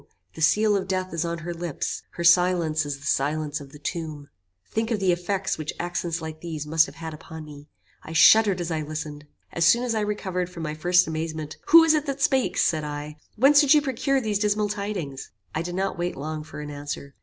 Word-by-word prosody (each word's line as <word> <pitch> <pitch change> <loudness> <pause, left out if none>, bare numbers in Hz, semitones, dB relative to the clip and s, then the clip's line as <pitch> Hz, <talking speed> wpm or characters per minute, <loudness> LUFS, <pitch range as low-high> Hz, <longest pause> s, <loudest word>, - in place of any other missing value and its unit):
The 160 - -9
seal 210 +6 +4
of 195 -1 -1
death 185 -1 -2
is 165 0 -1
on 170 0 -2
her 175 - -3
lips. 170 -3 -4
Her 170 - -4
silence 170 -3 +3
is 145 -1 -3
the 140 - -13
silence 150 +2 -1
of 140 -1 -12
the 150 - -12
tomb." 155 -2 -5 0.4
Think 220 0 -1
of 225 -3 0
the 190 -2 +2
effects 185 +2 -1
which 155 0 -4
accents 175 -1 -3
like 155 0 -7
these 160 -3 -5
must 160 +1 +3
have - - -12
had 160 -1 -7
upon 160 +1 -9
me. 145 -1 -12 0.3
I - - -10
shuddered 200 +3 +6
as 175 -1 -3
I 160 -1 -1
listened. 150 -1 -6 0.3
As 170 - 0
soon 235 +8 +5
as 245 -2 -1
I 220 - 0
recovered 190 -4 -2
from 170 -2 -8
my 150 -1 -3
first 175 +4 +3
amazement, 155 -1 -4
"Who 330 +1 +9
is 325 -1 +4
it 305 -1 0
that 275 0 -3
speaks?" 265 -3 +2
said 155 -2 +1
I, 150 0 -6 0.2
"whence 280 +6 +6
did 290 0 +5
you 300 - +5
procure 275 0 0
these 215 -5 -1
dismal 210 0 +1
tidings?" 200 -10 -4 0.2
I 155 - -1
did 175 +1 -5
not 190 -2 -2
wait 175 +1 -2
long 155 +2 -5
for 150 - -9
an 150 0 -7
answer. 145 -1 -6
170 Hz, 225 wpm, -25 LUFS, 155-205 Hz, 0.4 s, Who